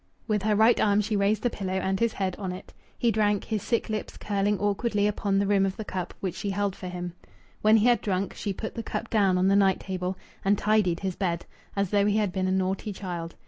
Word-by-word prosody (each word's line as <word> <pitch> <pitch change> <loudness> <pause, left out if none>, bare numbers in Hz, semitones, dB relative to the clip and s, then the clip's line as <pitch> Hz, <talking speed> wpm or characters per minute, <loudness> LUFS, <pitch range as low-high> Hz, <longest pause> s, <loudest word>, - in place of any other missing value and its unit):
With 210 -3 +1
her 210 +1 +2
right 220 +3 +5
arm 205 0 +3
she 210 +1 -1
raised 205 +1 +1
the 245 - +1
pillow 190 -2 -3
and 190 0 0
his 230 -1 +1
head 190 -2 -2
on 190 -3 -3
it. 180 - -9 0.2
He 235 - +2
drank, 210 -1 +1
his 215 -3 -2
sick 235 +3 0
lips 215 -1 -4
curling 205 0 0
awkwardly 205 +1 0
upon 205 -1 0
the 200 - +2
rim 200 -1 +3
of 195 0 -1
the 220 - -5
cup, 185 -3 -4
which 185 -3 -2
she 200 +2 -4
held 200 0 -1
for 185 - -7
him. 175 -1 -5 0.5
When 215 +1 +6
he 215 - +3
had 240 -3 +4
drunk, 195 -1 -1
she 205 - -3
put 220 +3 -5
the 230 - -4
cup 230 +1 -5
down 195 -4 +3
on 185 +1 +3
the 195 - +4
night 195 -2 +4
table, 185 -1 -3 0.3
and 200 +1 +3
tidied 210 -6 +2
his 190 -2 -2
bed, 170 -4 -2 0.3
as 200 -2 0
though 205 -1 +3
he 210 0 +2
had 210 -3 +1
been 190 -1 0
a - - +1
naughty 190 +2 -1
child. 175 -4 -5
200 Hz, 250 wpm, -27 LUFS, 190-210 Hz, 0.5 s, When